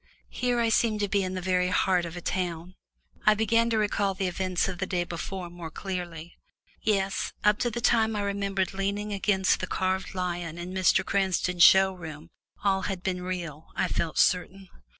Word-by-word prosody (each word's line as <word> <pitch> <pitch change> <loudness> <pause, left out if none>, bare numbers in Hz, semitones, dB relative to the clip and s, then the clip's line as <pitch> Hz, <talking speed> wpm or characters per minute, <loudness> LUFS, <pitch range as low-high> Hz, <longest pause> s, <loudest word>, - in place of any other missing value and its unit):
Here 245 -1 0
I 230 -1 +2
seemed 220 -1 +2
to 205 - +1
be 200 0 +1
in 185 0 -3
the 185 - -4
very 180 0 +2
heart 180 -1 +2
of 170 +1 -7
a - - -6
town. 175 -1 -3 0.5
I 215 - +7
began 230 +2 +2
to 225 - +1
recall 205 -2 +1
the 190 - -2
events 185 0 0
of 185 -2 -5
the 190 - -2
day 180 -1 0
before 175 +2 -5
more 170 -1 -8
clearly. 175 -2 -6 0.4
Yes, 195 -3 0
up 210 0 +4
to 240 - +1
the 235 +1 -4
time 225 -2 +3
I 205 - -1
remembered 200 -1 -1
leaning 200 +2 -2
against 195 -1 +2
the 185 - -3
carved 190 0 -1
lion 175 -2 -3
in 175 +1 -6
Mr. 185 -2 +3
Cranston's 185 -2 0
show 190 +2 +7
room 160 -2 -9 0.3
all 195 -1 +2
had 190 -2 -4
been 180 -2 -2
real, 170 -4 -5
I - - +1
felt 165 -2 -2
certain. 185 +1 +1
190 Hz, 190 wpm, -27 LUFS, 175-200 Hz, 0.5 s, I